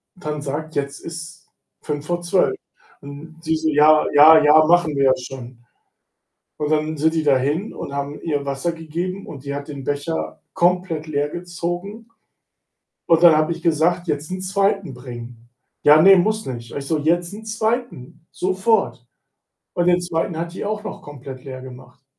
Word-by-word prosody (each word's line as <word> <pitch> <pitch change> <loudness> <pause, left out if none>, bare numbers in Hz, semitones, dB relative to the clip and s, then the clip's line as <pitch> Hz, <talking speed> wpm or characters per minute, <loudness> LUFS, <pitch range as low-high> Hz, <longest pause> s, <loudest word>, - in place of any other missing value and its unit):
dann 150 -4 -5
sagt: 150 +3 -5
„Jetzt 140 -1 -3
ist 165 0 -9 0.3
5 145 -1 -4
vor 175 0 -1
12.“ 185 - +1 0.5
Und 145 +3 -11
sie 160 -1 0
so: 160 0 0
„Ja, 150 +1 +5
ja, 155 +2 +8
ja, 150 +1 +7
machen 170 -3 +3
wir 140 0 +2
ja 130 - +5
schon.“ 125 -1 -10 0.9
Und 150 - -2
dann 155 0 0
sind 160 +2 +1
die 160 - +1
dahin 145 - +1
und 140 - -7
haben 140 +1 -4
ihr 145 -3 -2
Wasser 140 +5 -2
gegeben 170 +4 -5
und 140 -3 -9
die 140 0 -4
hat 140 +1 -6
den 140 -2 -7
Becher 145 +3 -3
komplett 175 -3 0
leergezogen. 175 +8 -4 1.0
Und 165 -1 +4
dann 165 -2 +8
habe 155 +2 +1
ich 165 - -5
gesagt: 170 +2 +1
„Jetzt 150 +2 -3
'n 185 - -4
2. 195 -3 0
bringen.“ 120 -2 -10 0.3
„Ja, 150 +1 +7
ne, 195 +2 +8
muss 215 +4 0
nicht.“ 120 -3 -7
Ich 140 -1 -5
so: 160 - +1
„Jetzt 170 +4 0
'n 220 +1 -9
2. 220 - -3
sofort.“ 190 - 0 0.7
Und 175 - 0
den 180 0 +4
2. 165 -1 -2
hat 170 +1 -4
die - - -5
auch 210 0 -3
noch - - -7
komplett 135 -2 -10
leer 130 -1 -7
gemacht. 125 0 -13
155 Hz, 170 wpm, -21 LUFS, 140-175 Hz, 1.0 s, ja